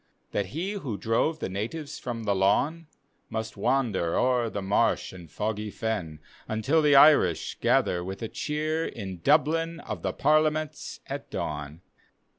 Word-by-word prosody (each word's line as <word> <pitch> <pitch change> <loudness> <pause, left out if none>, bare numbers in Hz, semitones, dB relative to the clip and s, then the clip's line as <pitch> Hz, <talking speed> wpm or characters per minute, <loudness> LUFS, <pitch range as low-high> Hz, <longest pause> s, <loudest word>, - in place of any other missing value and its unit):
That 100 -2 -1
he 170 - -3
who 140 - -4
drove 115 +10 +1
the - - -3
natives 115 - -5
from 120 -2 -5
the 100 - +1
lawn, 140 - +1 0.4
Must 110 0 -4
wander 115 -10 +1
o'er 125 -2 +2
the 105 - -4
marsh 95 0 +1
and 85 -3 -11
toggy 105 +5 -3
fen 105 -8 -3 0.3
Until 130 +9 +2
the 145 -2 +5
Irish 140 - +5
gather 90 -1 +2
with 95 +5 -6
a - - -1
cheer 155 +5 -2
In 95 -6 -7
Dublin 160 - +2
of - - -6
the - - -1
Parliaments 155 0 0
at - - -6
dawn. 75 +2 -5
115 Hz, 150 wpm, -27 LUFS, 100-155 Hz, 0.4 s, the